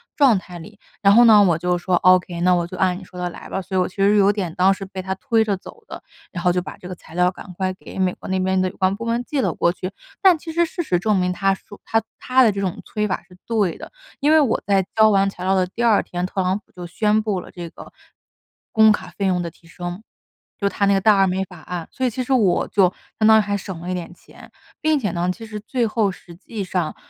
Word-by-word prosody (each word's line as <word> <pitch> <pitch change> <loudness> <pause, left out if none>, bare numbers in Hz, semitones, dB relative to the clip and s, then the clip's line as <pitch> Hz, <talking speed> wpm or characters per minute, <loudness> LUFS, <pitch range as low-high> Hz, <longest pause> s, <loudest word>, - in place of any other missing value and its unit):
状 265 -8 +5
态 180 -2 -9
里。 210 +4 -13 0.2
“然 200 0 +5
后 240 - +8
呢， 215 -2 +8
我 170 -4 +3
就 180 +1 0
说 180 +1 0
：“ok， 180 -1 +3
那 180 +1 +4
我 175 -1 0
就 185 - -9
按 185 -1 +1
你 - - -12
说 180 0 -14
的 180 0 -2
来 - - -11
吧，” 190 - -2
所 190 +1 -6
以 185 - +3
我 - - 0
其 - - -15
实 200 +1 +3
有 200 0 +5
点 185 -6 -3
当 190 +2 +4
时 195 0 -7
被 190 0 -7
他 190 0 -3
推 225 +1 +1
着 200 -3 -1
走 450 - -14
的， - - -9 0.3
然 175 0 -6
后 180 - +4
就 180 - 0
把 - - -9
这 180 - -11
个 185 - -6
材 165 - -16
料 180 0 +3
赶 185 - -11
快 185 -1 -1
给 - - -12
美 185 -1 +1
国 - - -10
那 190 - 0
边 190 0 +1
的 185 - +1
有 - - -15
关 190 0 +2
部 230 - -7
门 235 +1 -1
寄 285 +2 -3
了 - - 0
过 170 - +1
去。 185 +1 -6 0.3
但 370 -4 +6
其 325 +1 -8
实 340 0 +3
事 345 +2 -4
实 180 - 0
证 215 +1 +1
明， 180 0 0
他 195 +1 +1
说 205 +1 -15
他 225 0 +1 0.2
他 255 0 +3
的 220 - +5
这 200 - -4
种 185 -3 -3
催 210 0 -2
法 185 - -3
是 180 - -17
对 210 -7 0
的。 - - -10 0.3
因 295 +2 +2
为 315 - +6
我 275 -7 +1
在 195 -2 +2
交 220 0 +6
完 195 -1 +3
材 180 - -9
料 190 +1 +2
的 185 -1 +2
第 210 +6 -5
2 225 -3 +4
天， 175 0 -4
特 190 +1 -2
朗 185 +2 0
普 - - -34
就 180 -1 -9
宣 210 +4 +1
布 210 -3 -1
了 - - -13
这 175 -2 -8
个 - - -13 0.8
工 220 -1 +6
卡 - - -2
费 200 - -1
用 180 -2 +1
的 170 - -4
提 165 +1 -23
升。 175 +4 -7 0.6
就 200 - +2
他 200 - 0
那 200 - +3
个 195 - +2
大 210 0 +5
而 195 - +5
美 190 +1 0
法 180 -2 -12
案， 175 +1 -6
所 260 - -2
以 - - +2
其 255 +3 -3
实 270 - -6
我 210 -8 +2
就 190 -3 +3 0.2
相 215 - +3
当 220 0 +7
于 - - +4
还 205 0 -2
省 190 -3 -7
了 175 - -6
一 185 - -1
点 175 0 -6
钱， - - -17 0.3
并 310 -1 +2
且 210 -6 -1
呢， 175 +1 -1
其 225 - -12
实 215 -1 -7
最 235 +2 -1
后 215 -2 +1
实 175 -2 -14
际 205 +3 -6
上 180 -3 -2
190 Hz, 310 characters per minute, -21 LUFS, 180-215 Hz, 0.8 s, 后